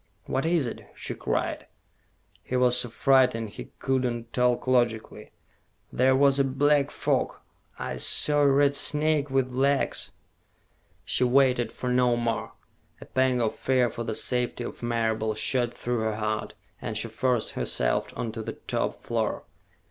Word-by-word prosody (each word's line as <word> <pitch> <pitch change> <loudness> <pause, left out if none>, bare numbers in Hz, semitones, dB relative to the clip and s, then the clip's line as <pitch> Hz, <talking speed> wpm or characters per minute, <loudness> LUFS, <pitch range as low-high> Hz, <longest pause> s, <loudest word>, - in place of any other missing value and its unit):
"What 135 +5 -1
is 165 -4 +2
it?" 120 - -7
she - - -4
cried. - - -2 0.7
He 130 - -4
was 125 -1 +4
so 125 -1 0
frightened 125 -3 +2
he - - -8
could 130 -1 0
not 120 -2 -3
talk 125 -1 +1
logically. 120 -3 0 0.6
"There 130 +1 +4
was 140 0 +4
a - - +5
black 140 +2 +2
fog - - -1 0.4
I 60 - -4
saw 145 - +3
a 145 - +5
red 140 +1 +4
snake 150 0 +1
with 135 -1 0
legs 135 +2 0 0.5
" - - -39
She - - +1
waited 125 -1 +3
for 125 - -4
no 125 -1 +3
more. 115 -2 -2 0.5
A - - -10
pang 130 -1 +1
of 110 - 0
fear 130 -2 +1
for 120 - -5
the 110 -2 -3
safety 125 0 -1
of - - -7
Marable 110 -2 0
shot 120 +1 +1
through 120 0 -3
her 110 -1 -1
heart, 110 0 -3 0.3
and 105 - -4
she 115 - -1
forced 120 0 0
herself - - -1
on 115 - -3
to 115 - -6
the - - -5
top - - -3
floor. - - -2
125 Hz, 165 wpm, -26 LUFS, 115-135 Hz, 0.7 s, a